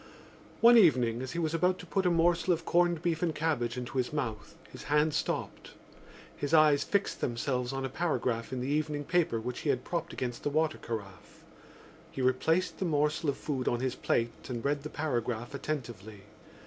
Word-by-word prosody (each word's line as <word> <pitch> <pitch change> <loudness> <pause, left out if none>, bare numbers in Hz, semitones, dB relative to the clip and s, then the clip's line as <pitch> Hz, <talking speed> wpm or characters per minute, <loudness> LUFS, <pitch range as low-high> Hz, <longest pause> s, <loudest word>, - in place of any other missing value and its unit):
One 235 0 +8
evening 125 - +4
as 130 -1 -5
he - - -5
was 160 -2 -1
about 180 +3 +2
to 180 - -10
put 190 +1 0
a - - +5
morsel 170 +1 +2
of 165 0 -4
corned 175 -1 +2
beef 165 -2 0
and 170 -3 0
cabbage 130 -7 -1
into 125 +1 -3
his 125 - -1
mouth 120 -8 -4
his - - -11
hand 150 +2 +2
stopped. - - -3 0.6
His 145 +3 0
eyes 150 -2 +5
fixed 200 -1 -1
themselves 125 +1 -1
on 135 0 -3
a - - 0
paragraph 130 -6 -1
in 130 -1 -3
the 125 - -3
evening 150 0 -1
paper 165 -7 +1
which 120 +2 -5
he 150 - -2
had 130 -2 +1
propped 170 -2 -3
against 120 -2 -4
the - - -1
water 155 +1 0
carafe. 100 -5 -8 0.7
He - - -9
replaced 160 +8 +1
the 190 - -1
morsel 150 -1 +1
of 140 - -1
food 135 -4 -3
on 120 - +1
his 130 0 -1
plate 120 -1 -2
and 120 -1 -4
read 145 0 +1
the 150 - -6
paragraph 120 -5 -2
attentively. 115 -9 -5
145 Hz, 195 wpm, -30 LUFS, 125-165 Hz, 0.7 s, One